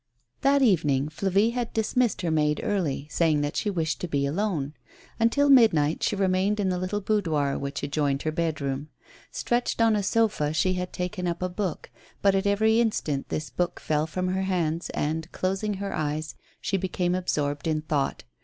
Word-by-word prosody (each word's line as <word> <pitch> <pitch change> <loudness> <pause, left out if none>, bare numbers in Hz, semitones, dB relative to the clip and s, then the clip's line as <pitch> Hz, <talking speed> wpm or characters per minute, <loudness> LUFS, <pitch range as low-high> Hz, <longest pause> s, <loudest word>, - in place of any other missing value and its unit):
That 275 0 +4
evening 150 - +2
Flavie 195 +7 +1
had 240 -1 -3
dismissed 225 -1 +1
her 170 - 0
maid 150 -1 +2
early, 150 -8 -1
saying 160 -3 +2
that 145 0 -2
she 210 - 0
wished 160 -7 -1
to 180 - -2
be 140 -3 0
alone. 155 -3 -1 0.5
Until 230 +6 +3
midnight 215 - +5
she - - +1
remained 195 +2 +1
in 195 -2 +1
the 180 -1 -1
little 185 +3 -2
boudoir 160 -10 0
which 140 +1 -4
adjoined 145 -1 0
her 155 - 0
bed 160 -1 -1
room. 140 +2 -3 0.4
Stretched 240 0 -1
on 225 -1 +4
a 205 - +1
sofa, 200 -8 +1
she 185 +5 +2
had 180 0 -3
taken 180 0 -3
up 170 +1 -2
a 185 - 0
book; 180 -2 -4 0.3
but 200 -1 +5
at 195 +1 +1
every 220 +3 +3
instant 155 -11 -1
this 155 -5 -3
book 175 +7 -2
fell 155 0 0
from 185 +2 -2
her 190 +1 0
hands, 175 -3 -1
and, 160 +3 -2
closing 195 +3 -1
her 200 +1 -4
eyes, 155 -1 -2 0.3
she 195 - -1
became 180 -1 -1
absorbed 145 -5 -1
in 155 -1 0
thought. 150 -3 -1
180 Hz, 185 wpm, -26 LUFS, 150-200 Hz, 0.5 s, midnight